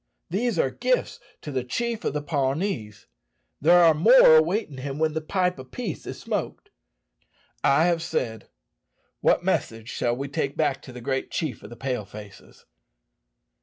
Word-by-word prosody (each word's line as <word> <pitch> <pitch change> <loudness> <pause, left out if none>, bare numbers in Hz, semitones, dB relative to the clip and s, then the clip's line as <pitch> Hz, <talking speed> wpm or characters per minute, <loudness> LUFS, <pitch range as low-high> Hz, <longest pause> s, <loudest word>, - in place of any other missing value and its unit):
These 220 +2 0
are 135 -4 +2
gifts 255 - -1 0.2
to 150 - -6
the 130 -2 -1
chief 230 - -3
of - - -1
the 150 -1 -3
Pawnees. 135 - -2 0.6
There 175 +4 +6
are 165 -1 +7
more 170 - +7
awaiting 160 -3 0
him 140 +1 -5
when 155 0 +1
the 160 - -2
pipe 180 0 -1
of 130 0 -10
peace 220 - -5
is - - -6
smoked. - - -4 0.9
I 145 +4 +4
have 170 -2 +1
said. 115 -8 -3 0.7
What - - +2
message 115 0 -1
shall 120 0 0
we 135 +3 -4
take 140 -1 -3
back 135 - 0
to - - -11
the 125 0 -9
great 135 +2 -2
chief 155 -6 -3
of 105 - -11
the 120 - -10
Pale 125 -3 -3
faces?" 105 -1 -13
145 Hz, 165 wpm, -25 LUFS, 130-175 Hz, 0.9 s, are